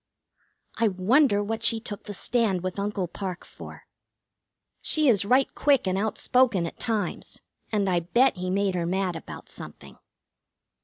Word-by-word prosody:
I 230 Hz, -, +4 dB
wonder 205 Hz, +4 st, +3 dB
what 220 Hz, +2 st, -3 dB
she 230 Hz, -1 st, +2 dB
took 215 Hz, -3 st, -7 dB
the 205 Hz, -, -6 dB
stand 210 Hz, -5 st, 0 dB
with 185 Hz, +1 st, -3 dB
Uncle 200 Hz, -2 st, -2 dB
Parke 180 Hz, 0 st, -6 dB
for? -, -, -11 dB, 1.0 s
She 310 Hz, -2 st, +2 dB
is 205 Hz, -5 st, +4 dB
right 255 Hz, +5 st, +4 dB
quick 280 Hz, -6 st, +2 dB
and 185 Hz, -, +1 dB
outspoken 220 Hz, 0 st, +2 dB
at 165 Hz, -, -8 dB
times, 215 Hz, -6 st, -3 dB, 0.3 s
and 205 Hz, -3 st, +1 dB
I 180 Hz, -2 st, +2 dB
bet 235 Hz, +8 st, +2 dB
he 180 Hz, 0 st, -3 dB
made 195 Hz, 0 st, +1 dB
her 170 Hz, -2 st, -1 dB
mad 185 Hz, -1 st, -1 dB
about 165 Hz, -, -9 dB
something. -, -, -10 dB
205 Hz, 155 wpm, -26 LUFS, 185-230 Hz, 1.0 s, I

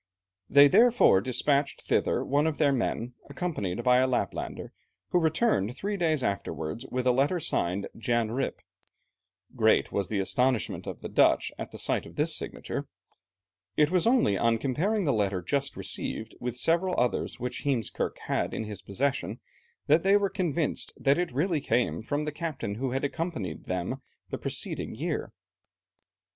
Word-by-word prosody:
They 140 Hz, +1 st, +8 dB
therefore 230 Hz, -, +5 dB
despatched 140 Hz, +4 st, 0 dB
thither -, -, +1 dB
one 145 Hz, +3 st, +2 dB
of 155 Hz, -, -1 dB
their 145 Hz, -3 st, +3 dB
men 125 Hz, -2 st, -1 dB, 0.2 s
accompanied 130 Hz, -, -3 dB
by 125 Hz, -1 st, +5 dB
a 130 Hz, +1 st, +4 dB
Laplander, 130 Hz, -, -3 dB, 0.4 s
who 180 Hz, -, +3 dB
returned 160 Hz, -, +1 dB
three 205 Hz, +1 st, -2 dB
days 160 Hz, -7 st, +1 dB
afterwards 100 Hz, +2 st, -3 dB
with 125 Hz, 0 st, -2 dB
a 125 Hz, -, +5 dB
letter 140 Hz, +8 st, +2 dB
signed 95 Hz, -, -1 dB
Jan 115 Hz, -1 st, 0 dB
Rijp. 130 Hz, +4 st, -1 dB, 1.0 s
Great -, -, +3 dB
was 100 Hz, -2 st, -1 dB
the 105 Hz, -, -2 dB
astonishment 125 Hz, +4 st, 0 dB
of -, -, -6 dB
the -, -, -5 dB
Dutch -, -, +3 dB
at -, -, -5 dB
the -, -, -10 dB
sight -, -, 0 dB
of -, -, -14 dB
this -, -, +2 dB
signature. -, -, -4 dB, 0.9 s
It 150 Hz, +1 st, +4 dB
was 185 Hz, +3 st, +2 dB
only 235 Hz, -, +3 dB
on 115 Hz, -1 st, +3 dB
comparing 170 Hz, -, 0 dB
the 140 Hz, -, +2 dB
letter 100 Hz, -4 st, 0 dB
just 140 Hz, +8 st, -1 dB
received 110 Hz, +1 st, -4 dB
with 125 Hz, 0 st, -4 dB
several 170 Hz, +6 st, +2 dB
others 125 Hz, 0 st, 0 dB
which 125 Hz, +1 st, -4 dB
Heemskerke 130 Hz, -7 st, -1 dB
had -, -, -1 dB
in -, -, -2 dB
his 105 Hz, -2 st, -7 dB
possession, 120 Hz, -1 st, -2 dB, 0.5 s
that 155 Hz, +3 st, +4 dB
they 195 Hz, +3 st, +5 dB
were 200 Hz, -1 st, 0 dB
convinced 170 Hz, -4 st, -1 dB
that 140 Hz, +4 st, +2 dB
it 180 Hz, -4 st, -1 dB
really 155 Hz, +4 st, 0 dB
came 120 Hz, -3 st, 0 dB
from 145 Hz, +6 st, -2 dB
the 150 Hz, -, -2 dB
captain 150 Hz, -9 st, -4 dB
who 130 Hz, +5 st, -2 dB
had 135 Hz, +2 st, -2 dB
accompanied 150 Hz, -, -3 dB
them 90 Hz, +9 st, -3 dB, 0.3 s
the -, -, -3 dB
preceding -, -, -3 dB
year. -, -, -3 dB
135 Hz, 165 wpm, -28 LUFS, 115-160 Hz, 1.0 s, They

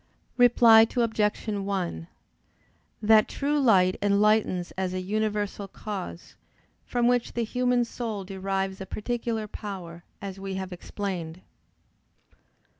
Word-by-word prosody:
Reply 235 Hz, -2 st, +7 dB
Obj. 220 Hz, -2 st, 0 dB
1: 195 Hz, -, -2 dB, 1.0 s
That 215 Hz, 0 st, +6 dB
true 290 Hz, +1 st, -1 dB
light 190 Hz, -8 st, +4 dB
enlightens 205 Hz, -3 st, +2 dB
as 185 Hz, -1 st, -3 dB
a -, -, -1 dB
universal 205 Hz, +1 st, -2 dB
cause, 195 Hz, -3 st, -7 dB, 0.5 s
from 240 Hz, -1 st, +1 dB
which 245 Hz, -1 st, +1 dB
the 235 Hz, -, -1 dB
human 250 Hz, +1 st, +1 dB
soul 225 Hz, -4 st, -5 dB
derives 195 Hz, 0 st, -3 dB
a 190 Hz, -, -6 dB
particular 230 Hz, +1 st, -3 dB
power, 180 Hz, -5 st, -8 dB, 0.2 s
as 195 Hz, -1 st, -7 dB
we 195 Hz, 0 st, -5 dB
have 190 Hz, -1 st, -5 dB
explained. 180 Hz, -2 st, -5 dB
205 Hz, 115 wpm, -27 LUFS, 190-225 Hz, 1.0 s, Reply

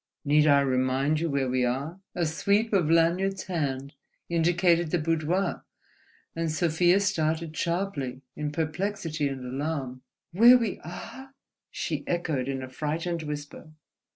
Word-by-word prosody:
"Need 150 Hz, +1 st, +4 dB
I 140 Hz, -1 st, +6 dB
remind 135 Hz, +3 st, +1 dB
you 165 Hz, 0 st, -1 dB
where 140 Hz, -2 st, 0 dB
we 125 Hz, 0 st, +1 dB
are?" 140 Hz, +9 st, -2 dB, 0.2 s
A 175 Hz, -, +1 dB
sweep 200 Hz, +8 st, +1 dB
of 175 Hz, -6 st, +3 dB
Lanyard's 180 Hz, +4 st, +2 dB
hand 140 Hz, -6 st, -3 dB, 0.4 s
indicated 170 Hz, 0 st, +2 dB
the 175 Hz, -, +1 dB
boudoir; 165 Hz, +3 st, 0 dB, 0.7 s
and 165 Hz, -1 st, -1 dB
Sofia 175 Hz, +3 st, +3 dB
started 160 Hz, -5 st, -1 dB
sharply 165 Hz, -8 st, -2 dB
in 150 Hz, -1 st, -3 dB
perplexity 160 Hz, 0 st, -2 dB
and 135 Hz, -2 st, -5 dB
alarm. 135 Hz, -1 st, -3 dB, 0.3 s
"Where 235 Hz, +8 st, +8 dB
we 230 Hz, -5 st, -2 dB
are!" 265 Hz, +10 st, -9 dB, 0.3 s
she -, -, -3 dB
echoed 160 Hz, -7 st, -1 dB
in 135 Hz, -1 st, -3 dB
a -, -, -6 dB
frightened 160 Hz, +5 st, -3 dB
whisper. 150 Hz, +1 st, -7 dB
160 Hz, 135 wpm, -27 LUFS, 140-175 Hz, 0.7 s, Where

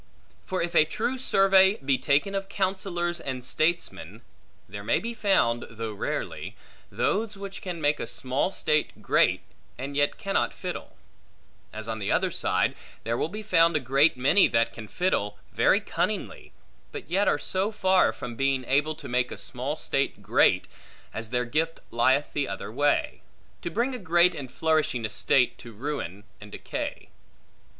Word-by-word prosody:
For 185 Hz, -2 st, -1 dB
if 170 Hz, -, -3 dB
a -, -, +6 dB
true 235 Hz, +11 st, -2 dB
survey 195 Hz, -4 st, +5 dB
be 135 Hz, -7 st, 0 dB
taken 150 Hz, +8 st, +2 dB
of 195 Hz, 0 st, -3 dB
counsellors 185 Hz, -3 st, -1 dB
and 130 Hz, -4 st, -5 dB
statesmen, 170 Hz, +6 st, -1 dB, 0.4 s
there 100 Hz, +2 st, -8 dB
may 105 Hz, -, +2 dB
be 235 Hz, +1 st, -4 dB
found 195 Hz, -, +1 dB
(though 115 Hz, -1 st, -5 dB
rarely) 100 Hz, -, -4 dB, 0.4 s
those 215 Hz, 0 st, -1 dB
which 195 Hz, 0 st, -7 dB
can 180 Hz, -3 st, -5 dB
make 145 Hz, -1 st, +1 dB
a -, -, -4 dB
small 130 Hz, +7 st, -1 dB
state 150 Hz, -5 st, -1 dB
great, -, -, +3 dB, 0.4 s
and 135 Hz, +3 st, -5 dB
yet 145 Hz, 0 st, +1 dB
cannot 195 Hz, -2 st, -1 dB
fiddle; -, -, -6 dB, 0.7 s
as 110 Hz, 0 st, -6 dB
on 110 Hz, -1 st, -3 dB
the 100 Hz, -, -2 dB
other -, -, +2 dB
side, -, -, +1 dB, 0.3 s
there 115 Hz, +2 st, -1 dB
will 150 Hz, -, -1 dB
be 215 Hz, +4 st, -6 dB
found 170 Hz, -5 st, +4 dB
a -, -, +4 dB
great 135 Hz, +3 st, +3 dB
many, 145 Hz, +10 st, +5 dB
that 115 Hz, 0 st, +1 dB
can 110 Hz, -1 st, -9 dB
fiddle 105 Hz, -, -1 dB, 0.2 s
very -, -, +4 dB
cunningly, -, -, -3 dB, 0.4 s
but -, -, -7 dB
yet 195 Hz, +4 st, +1 dB
are -, -, +3 dB
so 190 Hz, +7 st, -1 dB
far 190 Hz, -3 st, +3 dB
from 120 Hz, -, -7 dB
being 135 Hz, 0 st, 0 dB
able 150 Hz, +4 st, +1 dB
to 150 Hz, -2 st, -10 dB
make 125 Hz, 0 st, 0 dB
a -, -, -6 dB
small 130 Hz, +4 st, -3 dB
state 140 Hz, -3 st, -1 dB
great, -, -, +3 dB, 0.5 s
as 110 Hz, 0 st, -6 dB
their 125 Hz, +1 st, 0 dB
gift 160 Hz, +6 st, -1 dB
lieth 130 Hz, +5 st, +2 dB
the 145 Hz, -2 st, -1 dB
other 95 Hz, +2 st, -5 dB
way; 145 Hz, +4 st, +1 dB, 0.4 s
to -, -, -3 dB
bring 240 Hz, +9 st, -1 dB
a 250 Hz, -, -5 dB
great 175 Hz, -1 st, +4 dB
and 130 Hz, -3 st, -7 dB
flourishing 155 Hz, -7 st, 0 dB
estate, 115 Hz, +4 st, +2 dB
to 120 Hz, -, -10 dB
ruin 110 Hz, -, -5 dB, 0.2 s
and 105 Hz, 0 st, -11 dB
decay. -, -, -5 dB
150 Hz, 170 wpm, -26 LUFS, 125-185 Hz, 0.7 s, a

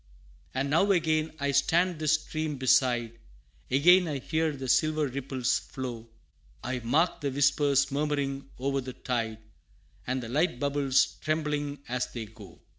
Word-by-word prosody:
And 135 Hz, +2 st, -1 dB
now 180 Hz, +6 st, +3 dB
again 160 Hz, -3 st, +1 dB
I 140 Hz, 0 st, 0 dB
stand 165 Hz, +5 st, +2 dB
this 155 Hz, -1 st, +2 dB
stream 155 Hz, -1 st, -2 dB
beside; 120 Hz, -3 st, +2 dB, 0.5 s
Again 175 Hz, +7 st, +5 dB
I 150 Hz, -3 st, -2 dB
hear 160 Hz, +4 st, -1 dB
the 135 Hz, -2 st, -6 dB
silver 155 Hz, +4 st, +2 dB
ripples 130 Hz, -1 st, -1 dB
flow 120 Hz, -3 st, -7 dB, 0.5 s
I 130 Hz, 0 st, -2 dB
mark 160 Hz, +9 st, +1 dB
the 140 Hz, -, -1 dB
whispers 140 Hz, 0 st, +2 dB
murmuring 140 Hz, -1 st, -2 dB
o'er 135 Hz, +1 st, 0 dB
the 130 Hz, 0 st, -7 dB
tide, 115 Hz, -4 st, -3 dB, 0.7 s
And 130 Hz, 0 st, -1 dB
the -, -, -6 dB
light 145 Hz, 0 st, 0 dB
bubbles 140 Hz, -1 st, +1 dB
trembling 150 Hz, -2 st, -2 dB
as 125 Hz, +1 st, -1 dB
they 115 Hz, -2 st, -5 dB
go. 105 Hz, -4 st, -14 dB
140 Hz, 145 wpm, -28 LUFS, 130-155 Hz, 0.7 s, Again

